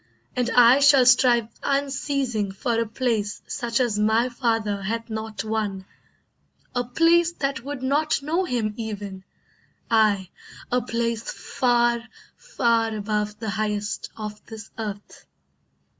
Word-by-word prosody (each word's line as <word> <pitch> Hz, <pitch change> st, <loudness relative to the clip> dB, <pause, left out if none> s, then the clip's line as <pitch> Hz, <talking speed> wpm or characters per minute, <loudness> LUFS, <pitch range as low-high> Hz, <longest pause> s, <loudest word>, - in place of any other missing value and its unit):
And 250 Hz, -1 st, 0 dB
I 245 Hz, +1 st, +6 dB
shall 280 Hz, -2 st, +6 dB
strive 240 Hz, -2 st, +5 dB
unceasing 275 Hz, -6 st, -1 dB
for 230 Hz, +4 st, -1 dB
a 230 Hz, -, 0 dB
place 220 Hz, -3 st, -2 dB
Such 235 Hz, 0 st, -2 dB
as 235 Hz, -5 st, +1 dB
my 220 Hz, +4 st, +2 dB
father 225 Hz, -5 st, -1 dB
hath 230 Hz, +3 st, -4 dB
not 220 Hz, -2 st, -4 dB
won, 210 Hz, -3 st, -2 dB, 0.9 s
a 245 Hz, -, 0 dB
place 335 Hz, +7 st, +3 dB
That 275 Hz, -6 st, -3 dB
would 280 Hz, -1 st, -6 dB
not 290 Hz, +4 st, +1 dB
know 330 Hz, +6 st, 0 dB
him 230 Hz, -8 st, -1 dB
even, 205 Hz, -4 st, -6 dB, 0.7 s
aye, 205 Hz, -4 st, +3 dB, 0.4 s
a 250 Hz, +1 st, +2 dB
place 230 Hz, 0 st, -2 dB
Far, 240 Hz, -1 st, +1 dB, 0.3 s
far 230 Hz, -, 0 dB
above 210 Hz, 0 st, -2 dB
the 220 Hz, -3 st, -4 dB
highest 210 Hz, 0 st, -2 dB
of 210 Hz, -1 st, -7 dB
this 220 Hz, -1 st, -10 dB
earth." 210 Hz, -2 st, -7 dB
230 Hz, 130 wpm, -24 LUFS, 215-250 Hz, 0.9 s, I